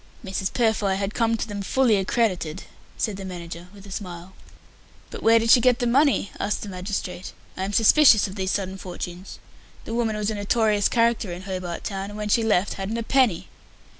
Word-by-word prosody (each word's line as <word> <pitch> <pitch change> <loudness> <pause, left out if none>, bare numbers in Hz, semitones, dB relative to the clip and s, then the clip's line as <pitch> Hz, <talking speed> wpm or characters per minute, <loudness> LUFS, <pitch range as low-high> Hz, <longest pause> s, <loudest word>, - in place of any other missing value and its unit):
Mrs. 190 0 -2
Purfoy 220 -5 +1
had 195 +1 -3
come 230 -1 +1
to 225 - -3
them 205 -2 -5
"fully 240 +2 +2
accredited," 190 -5 -1 0.3
said 210 -3 -2
the 195 - -7
manager 175 -2 -8
with 200 -1 -14
a 200 - -11
smile. 185 -2 -7 0.8
"But - - -7
where 225 +1 +5
did 230 0 +2
she 245 - +7
get 250 -1 +4
the 245 - -1
money?" 265 -3 +2
asked 210 - -2
the 205 - -6
magistrate. 185 -1 -5 0.2
"I 190 - -3
am 200 - -3
suspicious 225 -1 +6
of 190 - -8
these 190 -2 -3
sudden 190 -1 -2
fortunes. 180 0 -7 0.5
The 225 - -5
woman 230 -2 0
was 210 0 -1
a - - -3
notorious 210 0 +1
character 230 -4 +1
in 175 +2 -7
Hobart 185 -3 -5
Town, 195 0 -4
and 205 - -9
when 210 0 -4
she 230 - +3
left 205 -3 +1
hadn't 210 +4 -3
a 230 - -2
penny." 245 -8 +2
205 Hz, 200 wpm, -24 LUFS, 190-225 Hz, 0.8 s, she